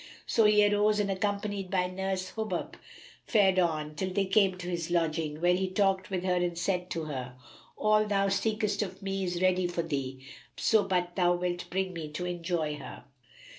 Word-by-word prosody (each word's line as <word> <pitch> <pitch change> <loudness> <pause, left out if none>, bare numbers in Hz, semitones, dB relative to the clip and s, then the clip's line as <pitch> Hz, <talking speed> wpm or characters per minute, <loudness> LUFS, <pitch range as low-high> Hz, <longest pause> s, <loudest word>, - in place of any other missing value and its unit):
So 225 - +3
he 210 0 +6
arose 210 +1 +2
and 200 -1 +1
accompanied 200 0 -2
by 180 -1 +1
nurse 185 0 -3
Hubub 220 -1 -3 0.5
fared 195 -4 +4
on, 155 -3 0
till 185 +5 -2
they 195 +1 +1
came 190 -1 +3
to 180 -1 -7
his 170 -1 -3
lodging, 160 -3 0
where 175 +1 +4
he 190 +1 0
talked 190 -1 +1
with 185 -2 -2
her 185 -1 +1
and 175 -1 -1
said 180 0 -1
to 165 -2 -3
her, 130 -4 -5 0.4
"All 215 0 +3
thou 200 -1 +2
seekest 210 +1 0
of 190 -1 -5
me 195 0 -2
is 175 0 -2
ready 185 -1 +3
for 175 -1 -2
thee, 135 -4 -4 0.3
so 220 -2 +4
but 180 -2 -1
thou 175 -2 +3
wilt 175 0 -3
bring 190 0 -1
me 160 -3 -5
to 180 +3 -3
enjoy 170 -3 -2
her." 140 - -9
185 Hz, 190 wpm, -29 LUFS, 175-195 Hz, 0.5 s, he